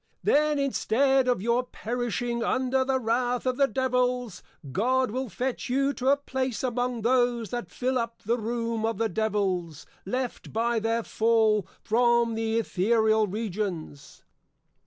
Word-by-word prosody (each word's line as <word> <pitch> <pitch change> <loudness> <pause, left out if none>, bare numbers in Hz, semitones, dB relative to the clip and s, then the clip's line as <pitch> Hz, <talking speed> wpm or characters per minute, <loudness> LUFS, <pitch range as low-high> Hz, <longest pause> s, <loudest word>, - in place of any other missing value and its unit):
_ - - -51 0.2
Then 300 0 +3
instead 270 -1 +2
of 245 -6 +1
your 235 +2 +2
Perishing 240 -1 -3
under 260 +1 +1
the 260 0 0
wrath 245 +1 0
of 255 -1 0
the 275 - +4
Devils, 250 -4 -1 0.3
God 255 - +1
will 255 +1 -3
fetch 255 +4 -3
you 275 +2 +1
to 260 0 0
a 280 - +5
place 265 -3 -3
among 245 -2 -1
those 240 -2 +1
that 240 -8 -4
fill 255 +6 -1
up 230 0 -5
the 235 +4 0
Room 230 0 -2
of 225 0 0
the 225 0 0
Devils, 190 -8 -1 0.2
left 250 +5 -4
by 230 +1 +1
their 225 +1 0
Fall 220 -3 +2 0.2
from 235 0 +3
the 225 0 -1
Ethereal 220 +1 +2
Regions. 195 -7 -5
235 Hz, 150 wpm, -27 LUFS, 220-255 Hz, 0.3 s, a